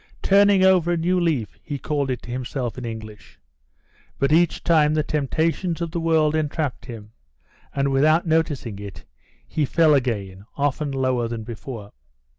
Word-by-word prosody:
"Turning 200 Hz, -1 st, +5 dB
over 180 Hz, -2 st, +4 dB
a -, -, 0 dB
new 180 Hz, +3 st, +1 dB
leaf," 135 Hz, -, -1 dB
he 145 Hz, -, -5 dB
called 140 Hz, -1 st, -2 dB
it 125 Hz, -2 st, -3 dB
to 120 Hz, -, -8 dB
himself 125 Hz, -1 st, -4 dB
in 125 Hz, -, -6 dB
English. 110 Hz, -2 st, -9 dB, 0.8 s
But 140 Hz, +2 st, +1 dB
each 170 Hz, +1 st, +3 dB
time 155 Hz, -2 st, +3 dB
the 155 Hz, -, +1 dB
temptations 160 Hz, +4 st, -1 dB
of 170 Hz, -2 st, -3 dB
the 170 Hz, -, -2 dB
world 160 Hz, -2 st, +2 dB
entrapped 155 Hz, -3 st, -2 dB
him, 110 Hz, -4 st, -9 dB, 0.6 s
and 140 Hz, 0 st, +1 dB
without 155 Hz, +6 st, +3 dB
noticing 150 Hz, -, -1 dB
it 100 Hz, -2 st, -9 dB, 0.4 s
he 155 Hz, -, -1 dB
fell 155 Hz, +2 st, +4 dB
again, 105 Hz, -7 st, -2 dB
often 145 Hz, +1 st, -1 dB
lower 130 Hz, -3 st, 0 dB
than 115 Hz, -1 st, -5 dB
before. 110 Hz, -2 st, -8 dB
145 Hz, 160 wpm, -23 LUFS, 120-160 Hz, 0.8 s, Turning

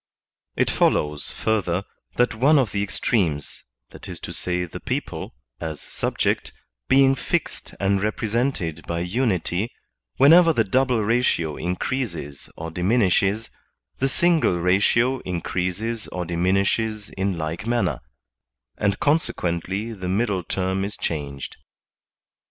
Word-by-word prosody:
It -, -, +2 dB
follows, 75 Hz, -1 st, +1 dB
further, 100 Hz, -4 st, 0 dB, 0.3 s
that 120 Hz, -1 st, +2 dB
one 140 Hz, +7 st, +4 dB
of 130 Hz, -7 st, +2 dB
the 100 Hz, -, -1 dB
extremes, 90 Hz, -, -1 dB, 0.3 s
viz, -, -, -8 dB
the 90 Hz, -1 st, -3 dB
people, -, -, -4 dB, 0.2 s
as 80 Hz, -3 st, -4 dB
subject, -, -, -1 dB, 0.4 s
being 135 Hz, 0 st, +6 dB
fixed 135 Hz, -, -3 dB
and 100 Hz, 0 st, +2 dB
represented 105 Hz, -, -1 dB
by 85 Hz, 0 st, -2 dB
unity, 95 Hz, 0 st, 0 dB, 0.5 s
whenever 165 Hz, +5 st, +7 dB
the 115 Hz, -, +3 dB
double 125 Hz, +1 st, +2 dB
ratio 105 Hz, -9 st, +1 dB
increases 90 Hz, -, -3 dB
or 80 Hz, 0 st, -5 dB
diminishes, 100 Hz, +3 st, +2 dB, 0.5 s
the 135 Hz, -, +2 dB
single 165 Hz, -, +3 dB
ratio 105 Hz, +9 st, +3 dB
increases 90 Hz, +5 st, -2 dB
or 90 Hz, -1 st, -4 dB
dimin 85 Hz, +3 st, +1 dB
ishes 110 Hz, 0 st, -1 dB
in 95 Hz, -2 st, -1 dB
like 80 Hz, +7 st, -4 dB
manner, 115 Hz, -, +1 dB, 0.8 s
and 100 Hz, -1 st, +1 dB
consequently 100 Hz, -, 0 dB
the 95 Hz, -4 st, -5 dB
middle 100 Hz, -1 st, +1 dB
term 95 Hz, +2 st, -1 dB
is 100 Hz, +2 st, -4 dB
changed. 70 Hz, -4 st, -4 dB
100 Hz, 115 wpm, -23 LUFS, 90-115 Hz, 0.8 s, whenever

